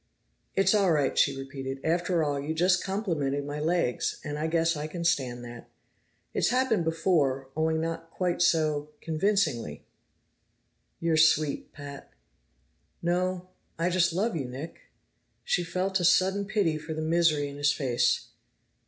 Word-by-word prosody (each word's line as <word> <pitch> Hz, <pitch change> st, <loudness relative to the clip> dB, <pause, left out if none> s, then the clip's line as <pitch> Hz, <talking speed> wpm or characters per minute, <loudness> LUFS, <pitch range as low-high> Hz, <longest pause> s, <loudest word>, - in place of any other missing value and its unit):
"It's 195 Hz, +1 st, +4 dB
all 200 Hz, -4 st, +3 dB
right," 145 Hz, -4 st, +1 dB
she 140 Hz, -2 st, +3 dB
repeated. 135 Hz, 0 st, -6 dB
"After 170 Hz, +1 st, +1 dB
all, 145 Hz, -2 st, -1 dB
you 150 Hz, +3 st, -3 dB
just 180 Hz, +2 st, +3 dB
complimented 160 Hz, -9 st, -1 dB
my 145 Hz, +1 st, -4 dB
legs, 160 Hz, -5 st, 0 dB
and 150 Hz, -1 st, -4 dB
I 155 Hz, -, 0 dB
guess 165 Hz, 0 st, +1 dB
I 150 Hz, +1 st, -4 dB
can 170 Hz, +2 st, -5 dB
stand 125 Hz, -7 st, 0 dB
that. 120 Hz, -1 st, -10 dB, 0.6 s
It's -, -, +2 dB
happened 245 Hz, -8 st, +1 dB
before, 160 Hz, -6 st, +1 dB
only 160 Hz, +1 st, +1 dB
not 165 Hz, 0 st, -3 dB
quite 175 Hz, 0 st, -1 dB
so 155 Hz, -4 st, +2 dB
convincingly!" 155 Hz, -, -1 dB, 1.1 s
"You're 165 Hz, -1 st, +1 dB
sweet, 155 Hz, -2 st, +3 dB
Pat!" 145 Hz, -1 st, -10 dB, 0.9 s
"No; 180 Hz, +1 st, -1 dB, 0.3 s
I 170 Hz, +2 st, 0 dB
just 175 Hz, -1 st, +3 dB
love 205 Hz, +6 st, 0 dB
you 145 Hz, -5 st, -2 dB
Nick." 135 Hz, +6 st, -7 dB, 0.6 s
She 180 Hz, -, +1 dB
felt 185 Hz, +3 st, -1 dB
a -, -, -2 dB
sudden 190 Hz, +3 st, +3 dB
pity 195 Hz, -7 st, 0 dB
for 160 Hz, +1 st, -6 dB
the 155 Hz, -, -3 dB
misery 160 Hz, -3 st, +2 dB
in 140 Hz, 0 st, -8 dB
his 145 Hz, 0 st, +3 dB
face. 130 Hz, -4 st, 0 dB
160 Hz, 150 wpm, -28 LUFS, 145-180 Hz, 1.1 s, It's